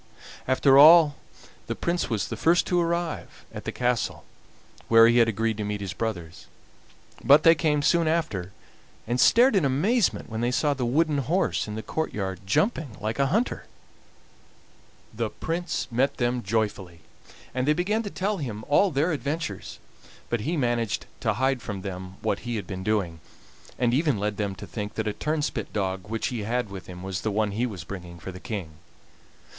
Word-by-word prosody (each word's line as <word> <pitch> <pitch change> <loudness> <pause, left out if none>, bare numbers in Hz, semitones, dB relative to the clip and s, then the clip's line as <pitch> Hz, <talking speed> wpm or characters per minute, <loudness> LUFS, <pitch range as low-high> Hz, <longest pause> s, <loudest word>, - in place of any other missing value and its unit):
After 135 +1 +5
all 155 0 +8 0.5
the - - -2
Prince 170 -3 -1
was 105 -5 -1
the - - -3
first 170 +2 +3
to 180 -1 +1
arrive 170 -1 -3
at - - -8
the - - -2
castle 125 -2 -1 0.6
where 115 0 +7
he 120 +1 +4
had 115 - +5
agreed 110 0 -1
to 105 - -3
meet 105 0 -3
his 95 -3 -5
brothers, 85 -8 -5 0.8
but 145 +2 +6
they 165 - +8
came 150 -3 +1
soon 170 +1 +3
after, 155 - -1 0.5
and 120 +2 -1
stared 240 - +5
in 190 - +3
amazement 175 - +1
when 110 0 -4
they 120 - +1
saw 145 +4 +1
the 125 -3 -2
wooden 150 +3 +2
horse 165 +4 0
in 105 - -5
the 110 - -5
courtyard 100 -12 -3
jumping 160 - 0
like 110 +5 -3
a 140 - +3
hunter. 220 - -1 1.5
The - - -2
Prince 170 0 -3
met 135 +4 +1
them 120 0 0
joyfully, 100 -5 -2 0.5
and 130 +1 -1
they 150 - +5
began 195 +7 0
to 210 - -5
tell 200 +2 -2
him 110 - -5
all 190 +7 +4
their 155 +3 +1
adventures; 140 - -4 0.5
but 120 -2 0
he 160 +9 -1
managed 115 - 0
to - - 0
hide 130 +2 0
from 100 -5 -6
them 95 -1 -6
what 100 - 0
he 120 0 -4
had 105 - -4
been 95 -1 -6
doing, 95 -6 -1 0.6
and 120 -1 +1
even 145 -3 +2
led 105 0 -2
them 100 -2 -2
to 100 - -9
think 105 +4 -6
that 110 -1 -2
a 105 - -1
turnspit 150 -6 -2
dog 95 -1 -2
which 115 0 -2
he 120 - -4
had 115 0 -2
with 95 -2 -8
him 90 0 -9
was 95 -1 -4
the 110 - -1
one 105 0 0
he 115 +5 -1
was 95 -8 -7
bringing 90 -2 -8
for 90 +3 -8
the 90 - -10
King. 95 -6 -5
120 Hz, 185 wpm, -26 LUFS, 100-150 Hz, 1.5 s, all